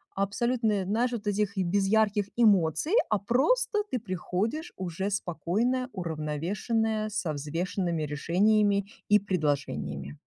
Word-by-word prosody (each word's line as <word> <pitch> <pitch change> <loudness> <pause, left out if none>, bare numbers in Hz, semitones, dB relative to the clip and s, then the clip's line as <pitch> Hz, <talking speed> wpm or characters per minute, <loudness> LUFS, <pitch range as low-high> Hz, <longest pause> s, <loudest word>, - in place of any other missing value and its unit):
Абсолютное, 210 0 0
наешь 230 +6 +1
вот 230 -3 -4
этих, 205 0 0
без 195 +2 +1
ярких 210 -1 +2
эмоций. 205 - +3 0.2
А 215 - +3
просто 420 - +2
ты 255 - 0
приходишь 210 - -3
уже 185 +1 -3
спокойная, 205 - -1
уравновешенная, 190 +7 -1
со 200 -7 -2
взвешенными 165 +3 -2
решениями 200 +7 +2 0.2
и 210 - +7
предложениями. 140 - -2
200 Hz, 110 wpm, -28 LUFS, 170-220 Hz, 0.2 s, и